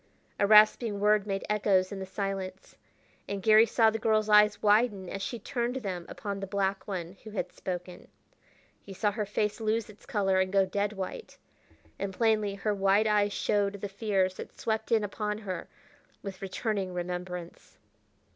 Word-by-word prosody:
A 200 - +3
rasping 215 0 +5
word 210 0 +3
made 195 -1 -2
echoes 200 -3 +2
in 200 - -5
the 190 - -6
silence, 195 -1 -5 0.5
and 200 - -3
Garry 220 +1 +6
saw 225 0 +4
the 225 - -3
girl's 215 -1 +1
eyes 210 0 +6
widen 210 -2 +2
as 195 +2 -5
she 235 - -3
turned 240 +1 -3
them 190 -9 -4
upon 200 -2 -5
the 195 - -5
black 195 0 -1
one, 185 -2 -5
who 220 - -9
had 185 -4 -4
spoken. 180 -1 -6 0.7
He 195 - -10
saw 205 +2 +1
her 210 0 -3
face 210 +2 -1
lose 220 0 -1
its 205 - -20
color 195 -6 +1
and 190 0 +1
go 195 -1 +4
dead 200 +2 -1
white, 195 - -6 0.6
and 200 0 -2
plainly 215 -3 +1
her 210 +1 -1
wide 195 +2 +3
eyes 210 -1 +2
showed 200 0 0
the 200 0 -5
fears 195 -2 0
that - - -9
swept 220 +1 -2
in 225 -2 +4
upon 210 +1 -3
her 195 -4 -6 0.5
with 195 -2 -7
returning 195 -1 -3
remembrance. 180 0 -6
205 Hz, 175 wpm, -29 LUFS, 190-215 Hz, 0.7 s, Garry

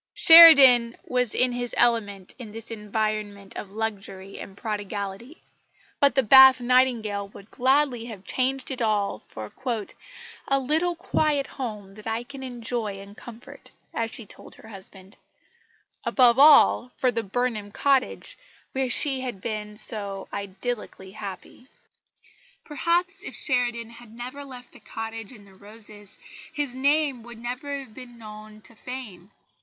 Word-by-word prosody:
Sheridan 275 -8 +8
was 250 -3 -1
in 250 0 +2
his 245 0 -4
element 205 -5 +1
in 225 -4 -9
this 225 +1 -8
environment 210 -2 -4
of 200 - -7
luxury 200 -2 -6
and 195 - -10
prodigality; 205 - -6 0.6
but 280 0 +3
the 265 - +3
Bath 265 +2 +8
Nightingale 240 -5 +1
would 200 +1 -16
gladly 260 -2 +1
have 215 -5 -9
changed 265 +5 -1
it 260 -1 -5
all 210 - 0
for 110 -1 -10 0.9
"a 275 0 +2
little 320 +6 0
quiet 300 -4 0
home 210 -9 -7
that 215 +2 -11
I 225 +1 -2
can 275 +2 -11
enjoy 235 -5 -4
in 200 +1 -12
comfort," 245 +6 -13 0.2
as 230 0 -2
she 230 - -4
told - - -10
her 220 - -15
husband 195 0 -12 0.9
above 250 -1 +4
all, 285 -4 +6
for 255 - +2
the 230 -1 -2
Burnham 215 -1 -3
cottage 280 - 0 0.3
where 265 -1 -2
she 270 +2 +2
had 245 -6 -5
been 210 0 -5
so 200 -4 +1
idyllically 200 0 -6
happy. 200 +4 -9 1.0
Perhaps 350 +6 -1
if - - -7
Sheridan 240 -4 -1
had 235 -1 -14
never 255 +4 -7
left 255 -3 -12
the - - -16
cottage 225 0 -7
and 210 -5 -15
the 195 - -19
roses, 205 0 -10 0.3
his 290 -4 -3
name 280 0 +1
would 240 0 -11
never 250 +5 -5
have 255 -5 -14
been 245 0 -12
known 215 -1 -12
to 230 - -12
fame. 220 -7 -9
235 Hz, 145 wpm, -24 LUFS, 210-260 Hz, 1.0 s, Sheridan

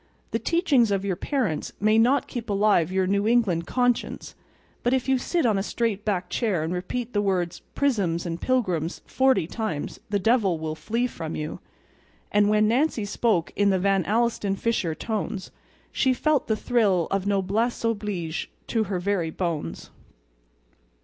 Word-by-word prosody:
The - - 0
teachings 295 - +2
of 200 -1 0
your 190 -2 0
parents 215 - -2
may 215 +2 +4
not 255 +4 +3
keep 235 -2 -6
alive 200 -4 +3
your 190 0 +1
New 200 +2 +1
England 205 -8 +2
conscience; 245 -1 0 0.5
but 245 +2 +2
if 260 0 -2
you 265 -1 +3
sit 335 +4 0
on 215 -4 +3
a - - 0
straight 210 0 -1
back 195 -4 -1
chair 195 -6 0
and 165 +3 -2
repeat 235 +7 -4
the 205 - +2
words 185 -4 -1 0.2
"prisms 195 -12 +1
and 170 0 -4
pilgrims" 185 -11 0
forty 265 -9 +2
times 200 -5 -4
the 205 - +1
devil 200 -3 +2
will 155 0 -3
flee 225 +10 -1
from 165 -9 -5
you. 155 0 -4 0.7
And 205 0 +4
when 215 0 +4
Nancy 245 -1 +1
spoke 205 -4 0
in 205 0 +3
the 190 - +3
Van 195 0 +2
Alstyne 220 -2 +1
Fisher 195 -7 -1
tones 215 -2 -4 0.4
she 260 -1 +2
felt 305 +2 +1
the 220 - +1
thrill 205 -8 +2
of 195 0 0
noblesse 205 +5 0
oblige 205 -8 -2 0.2
to 225 -2 +1
her 190 -1 -2
very 180 -3 0
bones. 160 - -4
205 Hz, 165 wpm, -25 LUFS, 180-235 Hz, 0.7 s, may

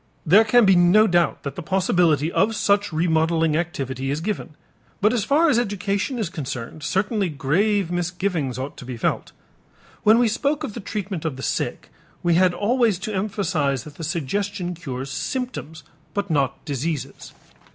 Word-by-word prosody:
There 195 +7 +7
can 230 +1 +5
be 195 -1 +6
no 175 +5 +6
doubt 175 -4 +1
that 140 - -4
the - - -5
possibility 170 -4 +2
of 215 +5 +2
such 205 -1 +2
remodeling 160 -1 +2
activity 135 -6 -3
is 145 +2 -1
given, 170 -3 -4 0.4
but 210 +4 +3
as 235 -4 +1
far 310 - +3
as 265 -7 +4
education 205 +2 -1
is 220 -5 -1
concerned 150 -5 -6
certainly 195 - 0
grave 175 +7 +1
misgivings 175 -6 -2
ought 130 +2 -5
to - - -9
be 125 -1 -6
felt. - - -1 0.7
When 215 +2 +6
we 240 0 +4
spoke 280 +7 0
of 225 - -4
the 235 - -6
treatment 195 -4 -4
of 160 -5 -2
the 130 - -8
sick, - - -3 0.3
we 175 -1 +3
had 180 +2 +4
always 225 +1 +1
to 205 +4 -5
emphasize 180 - -1
that 150 - -12
the 165 - -7
suggestion 180 +4 -2
cures 135 -6 -6
symptoms 160 - -4 0.3
but 200 -3 -2
not 140 -4 0
diseases. 140 -1 -4
175 Hz, 170 wpm, -23 LUFS, 150-205 Hz, 0.7 s, There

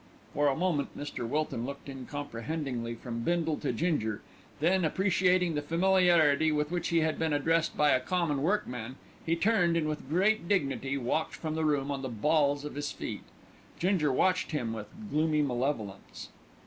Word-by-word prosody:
For 145 0 +2
a 135 - +2
moment 165 -4 -1
Mr. 145 -5 -4
Wilton 150 -4 -1
looked 140 +3 -7
uncomprehendingly 135 -2 -4
from 115 0 -6
Bindle 165 +3 0
to 145 - -2
Ginger; 115 -6 -1 0.4
then, 180 +4 +2
appreciating 180 0 +2
the 150 - -1
familiarity 165 -2 +4
with 150 +1 0
which 175 -1 -1
he 170 -1 +2
had 155 0 0
been 160 -2 +1
addressed 165 +3 +1
by 150 -1 +4
a 130 - +4
common 150 +1 -1
workman, 130 - -1 0.3
he 165 - +1
turned 175 -3 +2
and, 155 -2 0
with 150 -3 -4
great 190 +3 +2
dignity, 140 -7 0
walked 135 +5 -1
from 155 -2 -4
the 160 0 -1
room 145 -2 +1
on 140 -1 -3
the 130 - -4
balls 145 +4 +1
of 150 - -6
his 145 0 -3
feet. - - -5 0.6
Ginger 175 -5 +2
watched 185 +7 +2
him 120 -7 -1
with 105 -2 -6 0.2
gloomy 155 0 +2
malevolence. 120 -7 -3
150 Hz, 170 wpm, -30 LUFS, 135-170 Hz, 0.6 s, familiarity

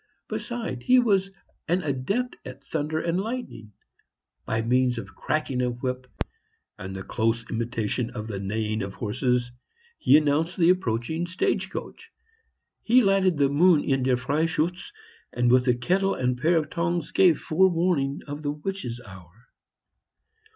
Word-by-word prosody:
Besides, 230 - -4
he 255 - +6
was 200 -6 +3 0.4
an 180 +2 +1
adept 155 - -1
at 130 +2 -10
thunder 155 +1 -2
and 170 +2 0
lightning; 225 - -6 0.7
by 110 0 0
means 125 +1 +2
of 100 -3 -7
cracking 145 -5 -1
a 125 - +1
whip 125 +1 -4 0.7
and 95 +1 -6
the 95 - -5
close 115 +2 -1
imitation 115 0 -1
of 105 - -6
the 105 -3 -5
neighing 110 +2 -2
of 100 0 -5
horses, 125 +2 -1 0.5
he 140 - +6
announced 155 +3 +1
the 175 -1 +5
approaching 160 -1 -1
stage 190 +1 -1
coach; 455 - -8 0.7
he 245 +2 +4
lighted 195 -4 +3
the 140 -1 +4
moon 160 +2 +4
in 135 -1 +1
"Der 130 0 +2
Freischutz;" 160 +6 -1 0.4
and 120 0 +2
with 125 +1 +4
a 125 - +4
kettle 190 +11 +1
and 125 -1 0
pair 165 +3 +3
of 155 -2 -1
tongs 170 -1 -1
gave 180 -4 +4
forewarning 165 -5 +1
of 145 +1 -6
the 145 - -2
witches' 150 -6 -5
hour. 95 +3 -15
140 Hz, 150 wpm, -26 LUFS, 120-175 Hz, 0.7 s, he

